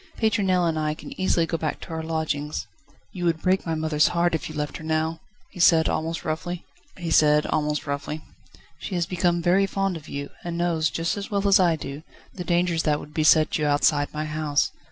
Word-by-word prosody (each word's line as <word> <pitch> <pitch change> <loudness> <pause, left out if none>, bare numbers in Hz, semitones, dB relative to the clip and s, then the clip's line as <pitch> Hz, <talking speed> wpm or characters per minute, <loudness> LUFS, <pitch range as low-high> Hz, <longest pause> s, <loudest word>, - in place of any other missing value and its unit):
Pétronelle 190 -5 +2
and 160 -1 0
I 155 0 -1
can - - -10
easily 175 -3 +2
go 165 0 -3
back 155 -2 -2
to - - -10
our 160 0 -3
lodgings." 155 -3 -2 0.5
"You 175 -1 -4
would 165 -2 +1
break 185 -1 +1
my 165 - 0
mother's 155 -1 +2
heart 175 0 +1
if 160 - -2
you 155 - -8
left 150 -1 -3
her - - -11
now," 160 +1 -1 0.3
he 180 - -11
said, 165 -2 +5
almost 165 +1 -2
roughly. 165 +3 -3 0.4
"She 150 +2 -1
has 175 -1 +1
become 175 -1 0
very 190 +3 +3
fond 195 -2 -1
of 155 -1 -13
you, 140 0 -5
and 170 -1 -4
knows, 165 -3 +1
just 165 +4 -2
as 200 - -5
well 200 -1 0
as 200 0 +6
I 175 -3 +4
do, 145 -1 -7 0.3
the 180 - -6
dangers 175 -1 +1
that 150 -2 +1
would 150 - -11
beset 155 0 +4
you 150 - +1
outside 145 0 +2
my 155 0 -3
house. 155 -1 0
160 Hz, 195 wpm, -25 LUFS, 155-175 Hz, 0.5 s, as